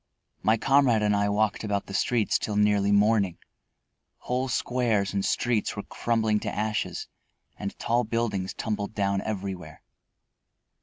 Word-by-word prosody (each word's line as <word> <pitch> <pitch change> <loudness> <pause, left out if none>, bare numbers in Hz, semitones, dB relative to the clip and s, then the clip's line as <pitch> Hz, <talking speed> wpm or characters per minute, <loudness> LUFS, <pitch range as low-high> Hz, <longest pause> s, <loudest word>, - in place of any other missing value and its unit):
My 110 +1 +3
comrade 130 -3 +3
and 105 -1 +3
I 100 0 +1
walked 105 +1 +1
about 100 -2 -1
the 95 - -9
streets 115 +2 +1
till 105 - -3
nearly 105 -1 +3
morning. 100 -3 +3 0.8
Whole 125 +1 -1
squares 115 -5 0
and 100 -1 0
streets 120 0 0
were 100 - -4
crumbling 110 -2 0
to - - -4
ashes 105 -5 -2 0.5
and 100 -1 -6
tall 120 +1 +1
buildings 105 -4 -2
tumbled 105 -1 -3
down 100 -1 0
everywhere. 95 -6 -5
105 Hz, 140 wpm, -27 LUFS, 100-115 Hz, 0.8 s, My